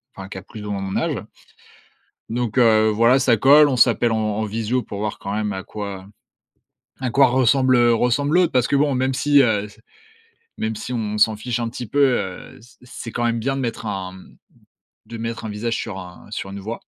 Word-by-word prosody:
enfin 95 Hz, 0 st, -8 dB
qui 95 Hz, -, -8 dB
a -, -, -7 dB
plus 105 Hz, -1 st, -10 dB
ou 105 Hz, -, -4 dB
moins 100 Hz, -1 st, -3 dB
mon 95 Hz, 0 st, -4 dB
âge. -, -, -2 dB, 1.1 s
Donc 120 Hz, 0 st, -3 dB
heu, 110 Hz, -2 st, +5 dB
voilà 115 Hz, +5 st, +4 dB
ça 125 Hz, -3 st, +3 dB
colle, 145 Hz, +5 st, +7 dB
on 135 Hz, -, 0 dB
s'appelle 120 Hz, -1 st, +3 dB
en -, -, 0 dB
en 110 Hz, 0 st, -1 dB
visio 115 Hz, +4 st, -2 dB
pour 100 Hz, -, -7 dB
voir 105 Hz, 0 st, -3 dB
quand 100 Hz, +1 st, -5 dB
même 105 Hz, -1 st, -1 dB
à 95 Hz, +1 st, -5 dB
quoi 100 Hz, -2 st, -7 dB, 0.9 s
à 130 Hz, -, -1 dB
quoi 135 Hz, 0 st, +5 dB
ressemble 130 Hz, +1 st, +3 dB
ressemble 125 Hz, +7 st, +1 dB
l'autre. 180 Hz, -1 st, +3 dB
Parce 125 Hz, -, +2 dB
que -, -, +1 dB
bon 145 Hz, -2 st, +2 dB
même 130 Hz, +1 st, 0 dB
si, 145 Hz, +1 st, +4 dB
heu, 105 Hz, -4 st, +1 dB
c 110 Hz, +1 st, -19 dB, 0.8 s
même 110 Hz, 0 st, -2 dB
si 120 Hz, -, -7 dB
on 105 Hz, -2 st, -2 dB
s'en 110 Hz, 0 st, +4 dB
fiche 120 Hz, +1 st, -3 dB
un 115 Hz, -1 st, -2 dB
petit 120 Hz, -1 st, -7 dB
peu, 145 Hz, -, -1 dB, 0.2 s
heu, 95 Hz, -2 st, -7 dB
c'est 125 Hz, -, -20 dB
c'est 120 Hz, -2 st, -9 dB
quand 120 Hz, -, -2 dB
même 115 Hz, -1 st, 0 dB
bien 135 Hz, +4 st, -1 dB
de 135 Hz, -, -3 dB
mettre 115 Hz, -2 st, -4 dB
un, 95 Hz, -3 st, -4 dB
mmh, 95 Hz, -, -16 dB, 0.7 s
de 115 Hz, -, -8 dB
mettre 115 Hz, 0 st, -5 dB
un -, -, -4 dB
visage 110 Hz, +2 st, -3 dB
sur 105 Hz, -4 st, -5 dB
un 90 Hz, -1 st, -12 dB
sur 95 Hz, -, -5 dB
une 100 Hz, +1 st, -7 dB
voix. 110 Hz, +4 st, -6 dB
115 Hz, 225 wpm, -21 LUFS, 105-125 Hz, 1.1 s, colle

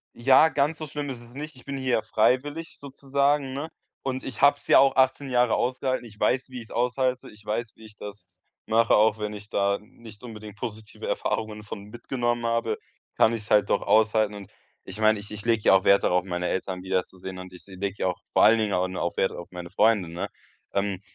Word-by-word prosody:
Ja, 135 Hz, +6 st, +6 dB
ganz 150 Hz, +1 st, 0 dB
so 155 Hz, -, -5 dB
schlimm 145 Hz, 0 st, -4 dB
ist 120 Hz, -2 st, -6 dB
es 120 Hz, +1 st, -16 dB
nicht. 150 Hz, +2 st, -7 dB
Ich 130 Hz, -, -16 dB
bin 140 Hz, 0 st, -5 dB
hier 130 Hz, -2 st, -1 dB
ja 110 Hz, -, +2 dB
freiwillig 145 Hz, +9 st, 0 dB
sozusagen, 140 Hz, 0 st, 0 dB
ne? 145 Hz, +4 st, -4 dB, 0.3 s
Und 130 Hz, -1 st, -3 dB
ich 130 Hz, -4 st, -6 dB
habe 140 Hz, 0 st, +7 dB
es -, -, -14 dB
ja -, -, +7 dB
auch 135 Hz, -1 st, +4 dB
18 130 Hz, +1 st, +2 dB
Jahre 125 Hz, -2 st, +3 dB
ausgehalten. 130 Hz, 0 st, -1 dB
Ich 105 Hz, -3 st, -13 dB
weiß, 125 Hz, +5 st, +1 dB
wie 130 Hz, -, -9 dB
ich 120 Hz, -, -8 dB
es -, -, -15 dB
aushalte. 125 Hz, +1 st, 0 dB
Ich 105 Hz, 0 st, -17 dB
weiß, 110 Hz, +1 st, -3 dB
wie 110 Hz, -, -15 dB
ich 105 Hz, -1 st, -14 dB
das 90 Hz, -3 st, -10 dB, 0.2 s
mache. 115 Hz, +1 st, +4 dB
Auch 110 Hz, 0 st, +4 dB
wenn 105 Hz, 0 st, -3 dB
ich 105 Hz, 0 st, -10 dB
da 100 Hz, 0 st, +1 dB
nicht 110 Hz, +1 st, -15 dB
unbedingt 105 Hz, -3 st, -9 dB
positive 110 Hz, +1 st, -7 dB
Erfahrungen 110 Hz, -1 st, -2 dB
von 100 Hz, -1 st, -8 dB
mitgenommen 120 Hz, +2 st, -2 dB
habe, 115 Hz, 0 st, 0 dB, 0.4 s
kann 110 Hz, -, +5 dB
ich 115 Hz, -2 st, -3 dB
es 105 Hz, -, -12 dB
halt 105 Hz, -, +4 dB
doch -, -, +2 dB
aushalten. 110 Hz, -1 st, +3 dB
Und 100 Hz, -1 st, -10 dB, 0.3 s
ich 95 Hz, +3 st, -9 dB
meine, 110 Hz, 0 st, +4 dB
ich 100 Hz, -, -9 dB
ich 105 Hz, -1 st, -8 dB
lege 115 Hz, -2 st, +2 dB
ja -, -, +7 dB
auch 95 Hz, -, +4 dB
Wert 100 Hz, 0 st, +5 dB
darauf, 90 Hz, 0 st, +2 dB
meine 90 Hz, -1 st, -2 dB
Eltern 95 Hz, -1 st, -3 dB
wiederzusehen 95 Hz, 0 st, -3 dB
und 90 Hz, 0 st, -9 dB
ich 90 Hz, -, -11 dB
s -, -, -7 dB
lege 95 Hz, +1 st, -4 dB
ja 90 Hz, -, +1 dB, 0.2 s
vor -, -, +4 dB
allen 115 Hz, +1 st, +7 dB
Dingen 105 Hz, -2 st, 0 dB
au 90 Hz, 0 st, +1 dB
no 95 Hz, -, -5 dB
auf 85 Hz, -, -2 dB
Wert 95 Hz, -, +1 dB
auf 85 Hz, -, -8 dB
meine 90 Hz, -1 st, -7 dB
Freunde, 100 Hz, -2 st, +3 dB
ne? 90 Hz, +5 st, -4 dB, 0.4 s
Ähm, 100 Hz, -2 st, -1 dB
110 Hz, 235 wpm, -26 LUFS, 100-130 Hz, 0.4 s, habe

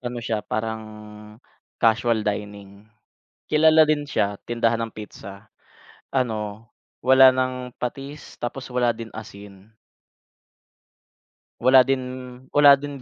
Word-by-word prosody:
ano 120 Hz, -1 st, -5 dB
siya 110 Hz, -2 st, -1 dB
parang 110 Hz, +1 st, -4 dB, 0.9 s
casual 115 Hz, 0 st, +2 dB
dining. 100 Hz, 0 st, -6 dB, 0.6 s
Kilala 155 Hz, +1 st, +5 dB
din 150 Hz, -1 st, -1 dB
siya 100 Hz, -7 st, -1 dB
tindahan 115 Hz, -1 st, 0 dB
ng -, -, -21 dB
pizza. 100 Hz, -1 st, -10 dB, 0.7 s
Ano, 110 Hz, -4 st, -3 dB, 0.3 s
wala 130 Hz, 0 st, +7 dB
ng 130 Hz, -1 st, -3 dB
patis 135 Hz, +4 st, -7 dB
tapos 125 Hz, +2 st, -6 dB
wala 125 Hz, -1 st, +1 dB
din 115 Hz, 0 st, -9 dB
asin. 100 Hz, -2 st, -12 dB, 1.9 s
Wala 130 Hz, +2 st, +7 dB
din 135 Hz, 0 st, 0 dB, 0.5 s
wala 145 Hz, -1 st, +7 dB
din 140 Hz, -1 st, -8 dB
120 Hz, 105 wpm, -23 LUFS, 110-130 Hz, 1.9 s, wala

